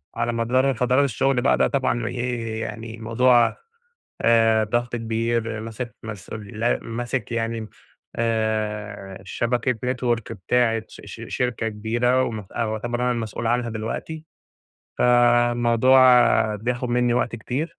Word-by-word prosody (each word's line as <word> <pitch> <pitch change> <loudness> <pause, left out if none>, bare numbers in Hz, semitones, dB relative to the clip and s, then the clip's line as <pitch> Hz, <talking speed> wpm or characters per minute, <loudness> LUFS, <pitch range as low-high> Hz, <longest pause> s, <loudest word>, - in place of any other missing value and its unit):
على 120 0 -1
مدار 130 +4 +1
فترات 125 +3 +2
الشغل 130 +2 +1
بقى 135 - +3
ده - - +3
طبعًا 130 -4 0
إيه 120 -2 -3
يعني 110 +1 -6
الموضوع 120 +2 +3 0.7
آآ، 115 -1 +4
ضغط 120 +2 -1
كبير، 115 0 -2
ماسك 115 +1 -6
مسؤول 105 -1 -8
ل 120 +1 +2
ماسك 120 0 -4
يعني 115 -1 -2 0.5
آآ، 110 -3 -2
شبكة 120 +4 0 0.2
Network 120 -3 -2
بتاعة 115 +3 +1
ش - - -13
ش - - -9
شركة 120 -2 -1
كبيرة 120 +4 +1
ومتأ 110 +1 -4
ويعتبر 115 +2 -3
أنا 125 - +2
المسؤول 115 -1 -4
عنها 120 0 0
دلوقتي، 115 +8 -5 0.7
فالموضوع 120 0 +4
بياخد 120 +3 -2
مني 120 0 +2
وقت 120 -1 0
كتير، 145 +9 -4
115 Hz, 125 wpm, -23 LUFS, 110-125 Hz, 0.7 s, آآ